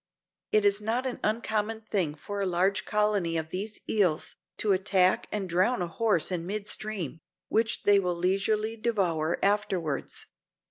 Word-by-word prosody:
It 215 -1 +4
is 200 +1 +3
not 230 +5 -1
an 255 - -3
uncommon 220 0 -1
thing 175 -8 +1
for 200 +6 -5
a - - +1
large 185 +3 +1
colony 210 -6 +1
of 160 0 -3
these 205 +5 -4
eels, 185 -8 +1 0.2
to 210 - +1
attack 185 -1 +3
and 205 -3 -2
drown 185 +4 +2
a - - -2
horse 190 0 +1
in 175 -1 -2
mid 205 +1 -3
stream, 200 -9 -3 0.3
which 225 +1 0
they 205 -1 +6
will 180 -2 -1
leisurely 195 +5 0
devour 185 -9 0
afterwards. 195 -7 -1
200 Hz, 155 wpm, -28 LUFS, 180-215 Hz, 0.3 s, they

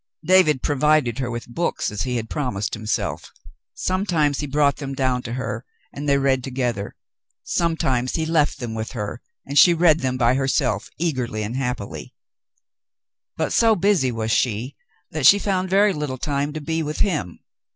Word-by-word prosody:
David 175 -7 +4
provided 145 -4 +2
her 130 -2 -2
with 120 -1 -5
books, 145 +1 -2
as 105 - -4
he 125 -1 -2
had 115 -2 -2
promised 105 -9 -3
himself. 110 0 -3 0.4
Sometimes 175 -7 0
he 145 - -3
brought 140 0 +2
them 135 -2 -5
down 130 -2 0
to 115 - -6
her, 125 -2 -4 0.3
and 145 +1 -4
they 140 - +4
read 135 -2 +1
together; 120 -6 -3 0.5
sometimes 135 -7 0
he 160 - 0
left 160 -2 +1
them 120 -3 -4
with 110 +2 -5
her 105 0 -5 0.2
and 140 +1 +2
she 175 -2 +7
read 165 -2 +4
them 130 -1 -1
by 120 -1 +3
herself 130 -6 0
eagerly 130 -10 -2
and 110 +4 -4
happily; 125 -6 -4 1.2
but - - -1
so 225 -1 +4
busy 185 -9 +2
was 110 -1 -2
she 120 +4 0 0.4
that 150 -4 +3
she 200 - +8
found 190 -2 -1
very 200 +2 +4
little 150 -4 -4
time 145 +2 -2
to 155 - -5
be 160 +2 -2
with 150 0 -3
him. 150 - -1
135 Hz, 170 wpm, -22 LUFS, 120-155 Hz, 1.2 s, she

